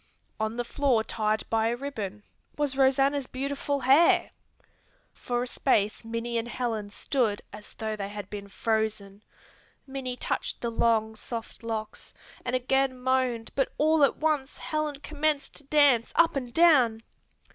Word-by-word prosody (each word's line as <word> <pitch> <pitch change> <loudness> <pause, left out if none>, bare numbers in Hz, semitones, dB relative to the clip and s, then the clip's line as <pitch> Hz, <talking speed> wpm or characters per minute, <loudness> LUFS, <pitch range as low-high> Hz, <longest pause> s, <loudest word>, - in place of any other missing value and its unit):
On 220 +1 -2
the 240 - 0
floor 245 -2 +1
tied 215 -1 -1
by 225 0 +2
a 235 - 0
ribbon, 215 -7 -5 0.3
was 290 -2 0
Rosanna's 270 0 +3
beautiful 280 +1 -2
hair! 275 +7 +5 0.8
For 245 0 -2
a - - -4
space 215 -5 +1
Minnie 230 +1 -2
and 230 - -4
Helen 230 -4 -3
stood 215 -1 -1
as 210 0 -10
though 220 -1 -3
they 200 -1 -5
had 205 -2 -7
been 200 -1 -7
frozen. 215 -1 -2 0.6
Minnie 265 -2 -4
touched - - -2
the 235 - -2
long, 220 -1 +1
soft 230 +1 -6
locks 220 -2 -5 0.3
and 250 0 -1
again 260 +1 +1
moaned 250 -3 0
but 270 - 0
all 310 0 +4
at 280 - +3
once 300 -3 0
Helen 305 -1 -2
commenced 300 -1 -1
to 290 - -12
dance 280 -5 +4
up 335 -1 +4
and 250 -3 -3
down. 255 -9 +4
245 Hz, 150 wpm, -27 LUFS, 220-275 Hz, 0.8 s, hair